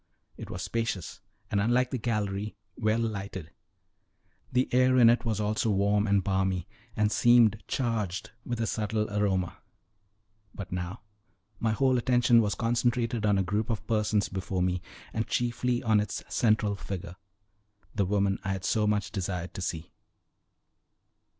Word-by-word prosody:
It - - -9
was - - -5
spacious, 115 -6 -3 0.3
and, 100 - +2
unlike 125 +4 +2
the 130 - -2
gallery, 105 -2 -2 0.2
well 110 -1 +1
lighted; 100 -7 -4 1.0
the 125 +1 +2
air 130 0 +4
in 115 -2 +8
it 120 +1 0
was 110 -3 0
also 105 +1 0
warm 100 +1 +2
and 100 -1 +3
balmy, 95 -2 0 0.3
and 105 -1 +2
seemed 115 -3 +5
charged 110 -8 -2
with 120 -1 -4
a 115 - +1
subtle 110 -1 -1
aroma. 95 -4 0 1.0
But 95 -3 -7
now 90 +3 -4 0.6
my 115 - +1
whole 130 +2 +2
attention 120 -1 +4
was 105 -2 0
concentrated 120 -1 0
on 100 -1 +3
a 95 - +2
group 105 +5 -1
of 105 -3 -2
persons 105 -2 +1
before 95 -1 -2
me, 90 -1 0 0.3
and 110 0 -1
chiefly 120 +1 0
on 110 -3 +4
its 105 -1 -3
central 105 -3 +2
figure 95 -2 -6 0.8
the 100 -2 +1
woman 100 -1 +1
I 95 - -1
had 95 -2 -5
so 105 +3 +2
much 105 -1 0
desired 90 -3 -3
to - - -6
see. 85 -2 -4
105 Hz, 150 wpm, -28 LUFS, 95-115 Hz, 1.0 s, in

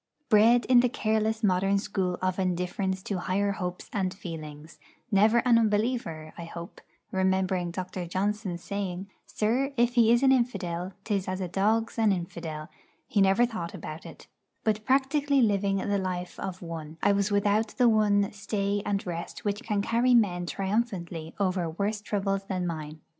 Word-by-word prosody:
Bred 230 +2 +5
in 250 -1 +6
the 250 0 +3
careless 220 0 0
modern 195 0 +3
school 190 -3 -1
of 185 0 0
indifference 185 +1 -1
to 200 -3 -2
higher 200 +3 0
hopes 180 -3 -5
and 190 -3 0
feelings; 155 -5 -9 0.3
never 220 +4 +4
an 235 -2 +6
unbeliever, 210 -8 -1
I 170 - -5
hope 170 +1 -9 0.3
(remembering 190 -1 +1
Dr. 180 0 -5
Johnson's 190 -1 -2
saying: 195 -1 -4 0.2
'Sir, 245 +6 0
if 240 +1 +3
he 230 -2 +5
is 240 +2 +4
an 265 - +6
infidel, 190 -8 0
'tis 200 -3 -1
as 185 0 -2
a 185 - -2
dog's 220 +6 0
an 220 -2 +4
infidel; 170 -4 -4 0.4
he 205 - +2
never 195 +5 +5
thought 205 -6 -5
about 160 -2 -7
it'), - - -12 0.4
but 215 -1 0
practically 275 +1 +3
living 200 -2 +2
the 200 +1 0
life 180 -1 -4
of 185 -1 -5
one, 160 -2 -7
I 200 - +5
was 200 0 +1
without 205 +2 +1
the 250 -1 +5
one 205 -3 +3
stay 205 -1 -2
and 200 -1 -1
rest 170 +2 -6
which 205 +1 -1
can 210 -4 -1
carry 240 +3 +3
men 180 -6 +2
triumphantly 190 -5 -2
over 185 -3 0
worse 200 +5 -2
troubles 195 -1 -1
than 185 -2 -2
mine. 155 -2 -5
200 Hz, 165 wpm, -28 LUFS, 180-220 Hz, 0.4 s, in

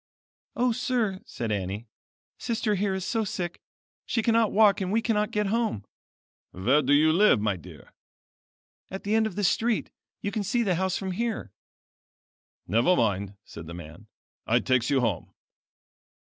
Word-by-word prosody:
"O 250 0 +2
sir," 225 -5 -1
said 115 -2 -4
Annie, 100 +2 -3 0.5
Sister 225 -3 -1
here 195 -1 0
is 190 -1 -4
so 225 +4 0
sick 175 -4 -4 0.5
she 225 - 0
cannot 225 -1 +3
walk 205 -1 +4
and 185 0 -2
we 220 - +3
cannot 215 -2 0
get 210 -2 0
home." 215 - -1 0.6
"Where 125 +12 +2
do 135 0 0
you 155 +2 +5
live 195 - +5
my 105 -1 0
dear?" 85 - -13 1.0
"At 190 - -6
the 205 - -1
end 220 0 +3
of 205 - -8
this 205 -3 +2
street; 225 -1 0 0.3
you 200 - -3
can 215 - -2
see 235 +5 +1
the 195 -4 +1
house 190 +2 0
from 190 -1 -4
here." 230 +4 -3 1.2
"Never 115 - +3
mind," 100 - 0
said 80 -1 -10
the 85 - -7
man, 80 -3 -11 0.4
"I - - +4
takes 130 -2 +1
you 135 -2 +3
home." 110 -8 -1
190 Hz, 165 wpm, -27 LUFS, -, 1.2 s, you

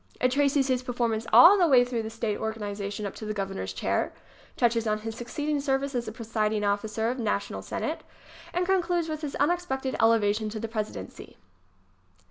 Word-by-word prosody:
It 255 - +2
traces 280 0 +2
his 255 -2 +1
performance 235 -3 -1
all 390 +4 +9
the 350 - +5
way 255 -4 +6
through 245 -2 -2
the 220 - -5
state 225 -2 -3
organization 210 -2 -4
up 200 - -4
to 220 - -7
the 215 - -3
Governor's 195 - -3
chair, 95 - -1 0.5
touches 230 -1 +2
on 215 0 0
his 225 0 -5
succeeding 290 +6 -2
service 275 0 0
as 240 -2 -2
presiding 215 -1 -1
officer 215 +2 0
of 255 - -5
the - - -2
National 205 -2 -2
Senate - - -3
ŌĆö - - -24 0.2
and 360 +1 +1
concludes 350 -3 +1
with 310 0 -4
his 295 -3 -4
unex 350 +4 +1
pected 265 0 -2
elevation 220 -1 +3
to 215 +1 -5
the 225 - -3
Presidency. 215 - -6
230 Hz, 190 wpm, -27 LUFS, 215-275 Hz, 0.5 s, all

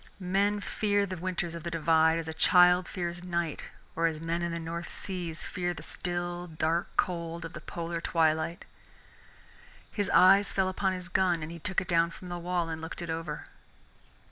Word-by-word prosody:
Men 200 +3 +1
fear 205 -1 +1
the 185 -1 -5
winters 175 -1 -3
of 170 - -6
the 170 - -4
Divide 160 0 +3
as 165 -1 -4
a 160 - -3
child 180 +1 +5
fears 175 -1 -4
night 170 -3 -2 0.3
or 165 +1 +3
as 160 -2 -3
men 165 +1 -2
in 170 0 -1
the 170 - -2
North 170 +1 -5
Seas 175 -4 -5
fear 175 -2 -2
the - - -9
still 175 0 -3
dark 160 +1 -1
cold 170 -1 -1
of 165 - -8
the 155 - -7
polar 170 0 -4
twilight. 160 0 +1 1.3
His 205 -2 -1
eyes 195 +2 +6
fell 190 -1 +1
upon 190 0 0
his 180 -1 -5
gun, 180 -3 +2
and 155 - -6
he 170 - -8
took 185 +4 0
it 185 - -7
down 170 -1 +3
from 180 +2 -10
the 175 0 -4
wall 175 -1 -1
and 160 -1 -4
looked 160 +1 -6
it 170 - -3
over. 160 -2 -4
170 Hz, 195 wpm, -29 LUFS, 165-180 Hz, 1.3 s, eyes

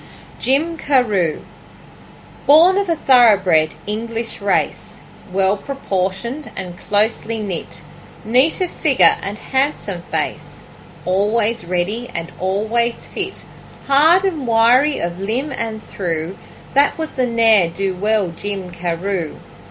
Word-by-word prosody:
Jim 310 +6 +1
Carew 215 - +1 1.1
Born 340 +7 +6
of 395 -3 -2
a 335 - +2
thoroughbred 200 - +4
English 225 +1 -4
race, 200 0 -1 0.3
Well 190 +1 +2
proportioned 235 +2 -4
and 180 -2 -6
closely 220 +3 0
knit, 200 -6 -6 0.4
Neat 255 - +2
of 360 - -1
figure 280 -5 +4
and 200 +2 -5
handsome 265 -9 -2
face, 150 -2 -4 0.4
Always 210 +3 0
ready 190 +8 -2
and 170 0 -4
always 220 +5 -1
fit, - - -5 0.4
Hard 315 +7 +5
and 315 -9 -2
wiry 240 +6 +4
of 170 +1 -4
limb 240 +9 -2
and 220 -1 -4
thew, 170 -1 -4 0.4
That 280 +1 +3
was 320 -1 -4
the 255 -1 -1
ne'er 225 -5 +4
do 190 +2 -2
well 205 0 0
Jim 190 +1 -5
Carew. 175 0 -3
215 Hz, 120 wpm, -18 LUFS, 185-260 Hz, 1.1 s, Born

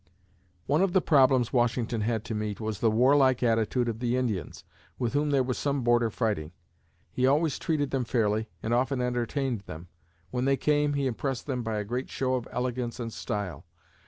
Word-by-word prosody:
One 150 +4 +2
of 190 -2 +2
the 190 - +5
problems 130 -7 +3
Washington 120 -2 +1
had 110 0 -1
to 115 - -4
meet 105 -1 -3
was 110 -2 -3
the 115 - +3
warlike 130 +3 +4
attitude 115 +1 +1
of 115 -1 -3
the 120 0 0
Indians, 110 -11 -3 0.3
with 120 -1 -2
whom 145 +1 +1
there 140 -2 +3
was 125 -1 -2
some 140 -2 -1
border 120 -1 +3
fighting. 100 -8 -2 0.6
He 130 0 +1
always 150 +1 +2
treated 145 -4 -1
them 130 -2 0
fairly 110 -2 0
and 115 - 0
often 130 +2 +1
entertained 125 -1 -1
them. 80 +3 -9 0.4
When 125 0 -1
they 135 0 +3
came, 145 0 +2
he 140 -1 0
impressed 130 +1 -2
them 130 -4 -2
by 110 -2 -2
a 105 - -1
great 125 +5 -3
show 130 -1 -1
of 125 -3 -2
elegance 125 -1 -3
and 115 -2 -4
style. 100 - -4
125 Hz, 190 wpm, -28 LUFS, 115-135 Hz, 0.6 s, the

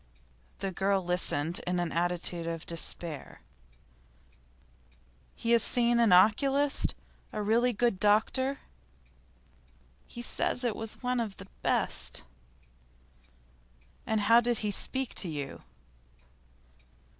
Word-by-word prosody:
The 195 - -3
girl 195 +1 0
listened 175 -2 +1
in 180 0 0
an 175 -2 -2
attitude 175 0 -1
of 165 -1 -5
despair. 165 -2 -5 1.9
'He 230 - -3
has 235 -1 +7
seen 240 +1 +3
an 230 -4 +3
oculist? 270 +10 +3 0.4
a - - -5
really 235 +4 +2
good 235 -3 0
doctor?' 225 +6 +1 1.5
'He 240 - -9
says 250 - -1
he 240 - +1
went 225 0 -5
to - - -10
one 250 0 -1
of 215 -4 -4
the 195 - -10 0.2
best.' - - 0 1.8
'And 220 -1 0
how 230 +3 +5
did 240 -1 0
he 210 - 0
speak 260 +5 +2
to 180 - +2
you? 145 -3 -6
210 Hz, 115 wpm, -29 LUFS, 175-240 Hz, 1.9 s, has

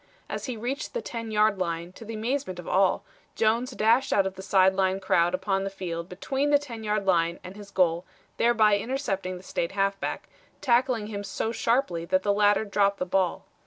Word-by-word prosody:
As - - -5
he 250 -4 -4
reached 265 - -4
the 480 - -1
10 230 -1 -5
yard 215 -2 +2
line, 170 -1 -3
to 225 - -11
the 225 0 -6
amazement 230 -3 -2
of 175 - -9
all, 190 0 +2 0.3
Jones 230 +3 +1
dashed 235 +1 +2
out 195 - +3
of 190 - -2
the 190 - -9
side 190 -1 +4
line 190 0 +1
crowd 175 -2 +2
upon 195 +1 -1
the 195 - -2
field 175 -3 -5
between 270 +10 -1
the 290 - +6
10 240 -6 -8
yard 210 -1 -1
line 170 -2 +2
and 185 +1 -9
his 205 -1 -11
goal, 175 -3 +2 0.3
thereby 215 -3 +4
intercepting 195 -7 -3
the 180 - -13
State 170 -2 -3
halfback, 195 0 -1 0.3
tackling 245 -3 +2
him 205 -1 -5
so 220 +2 -3
sharply 230 -7 0
that 185 +2 +1
the 205 - +2
latter 205 +1 +3
dropped 200 -1 +1
the 180 - -2
ball. 185 -1 0
200 Hz, 200 wpm, -26 LUFS, 185-230 Hz, 0.3 s, the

